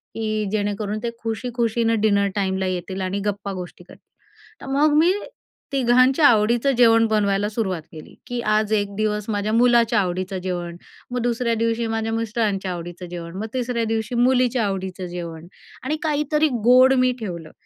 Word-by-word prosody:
की 215 -1 -2
जेणेकरून 205 0 -2
ते 235 - -1
खुशी 225 +2 -3
खुशीनं 230 -1 +1
डिनर 200 -2 +3
टाईमला 190 -1 -1
येतील 185 +1 -4
आणि 190 +2 -2
गप्पा-गोष्टी 195 -3 -5
करतील. - - -18 0.5
तर - - -9
मग 295 +1 +3
मी 340 +4 +5 0.6
तिघांच्या 255 +2 +4
आवडीचं 235 +4 +3
जेवण 230 -2 +5
बनवायला 205 -2 +1
सुरुवात 195 -6 -2
केली, 155 -2 -12
की 245 0 -3
आज 215 -1 +1
एक 205 -1 +1
दिवस 210 -1 -1
माझ्या 210 0 -1
मुलाच्या 235 -1 +4
आवडीचं 185 0 -2
जेवण, 175 -2 -4 0.4
मग 250 - -1
दुसऱ्या 235 0 0
दिवशी 230 +1 0
माझ्या 225 0 -2
मिस्टरांच्या 215 -4 -1
आवडीचं 175 +1 -7
जेवण, 170 0 -7
मग 210 - -3
तिसऱ्या 245 -2 -1
दिवशी 225 +1 -2
मुलीच्या 250 -1 +2
आवडीचं 190 -2 -4
जेवण 170 -2 -7 0.4
आणि 300 +4 -1
काहीतरी 300 0 +1 0.2
गोड 255 +2 +7
मी 255 - +3
ठेवलं 170 -7 -6
215 Hz, 155 wpm, -22 LUFS, 190-240 Hz, 0.6 s, गोड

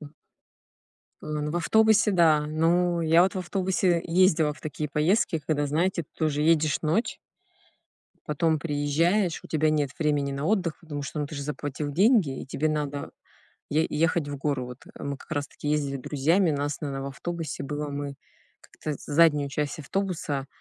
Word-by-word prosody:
Так. 150 -2 -10 1.1
Э, - - -9
ну 150 0 -2
в 170 - -2
автобусе 220 +4 +4
да. 160 -5 +4
Ну 170 +3 +2
я 165 +1 +5
вот 190 - +1
в - - -2
автобусе, 185 -1 +1
э, - - -6
ездила 165 -3 +3
в 155 - -15
такие 150 0 -4
поездки, 165 +5 +1
когда, 145 -2 +1
знаете, 170 +4 0
ты - - -21
тоже 150 -2 0
едешь 155 -1 +3
ночь. 165 +10 0 1.1
Потом 155 +1 +1
приезжаешь, 165 +5 +1
у - - -11
тебя 155 -1 +2
нет 145 -3 +1
времени 145 -3 +1
на 140 +1 -3
отдых, 185 -4 0
потому 145 -4 -6
что, 150 +2 -4
ну, 145 - -1
ты 150 - -9
же 140 - -4
заплатил 145 0 -4
деньги, 195 - +3
и - - -9
тебе 155 +3 -1
надо 145 -2 -3 0.6
е 155 +2 +2
ехать 160 -1 +1
в 145 -1 -5
гору. 135 -3 -1
Вот, 125 +1 -10
э, - - -10
мы 140 -1 -3
как - - -17
раз-таки 145 0 -3
ездили 145 -2 0
друзьями. 155 +7 +2
Нас, 145 +1 -2
наверно, 135 -2 -3
в - - -4
автобусе 165 +1 -5
было 145 +1 -4
мы 140 -1 -4 0.5
как-то 155 - -6
з - - -15
заднюю 150 -2 +4
часть 150 +3 -3
автобуса 155 -5 -2
150 Hz, 180 wpm, -26 LUFS, 145-170 Hz, 1.1 s, я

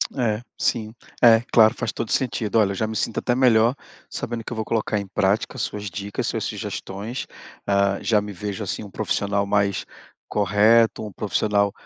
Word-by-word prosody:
É, 115 -4 0 0.2
sim. 110 -2 -1 0.3
É, 115 -2 +7
claro, 110 -1 +6
faz 115 - -2
todo 115 - -4
sentido. 115 -5 -1
Olha, 105 -3 +4
eu - - -4
já 110 +3 -1
me 110 - -5
sinto 110 - -1
até 120 - 0
melhor 120 -1 +4 0.3
sabendo 115 -1 -4
que - - -8
eu - - -3
vou 110 0 -3
colocar 110 -1 0
em 100 - -5
prática 95 +2 0
as - - -4
suas 105 0 -3
dicas, 100 +2 -4
suas - - -2
sugestões, 105 +7 -5 0.4
ah, 100 0 +2
já 110 -2 +3
me 105 0 -7
vejo, 100 +2 -5
assim, 100 - -4
um 100 - -9
profissional 100 0 -1
mais 100 -1 0 0.4
correto, 110 +3 +3
um 105 - -7
profissional 100 0 0
105 Hz, 185 wpm, -23 LUFS, 100-115 Hz, 0.4 s, É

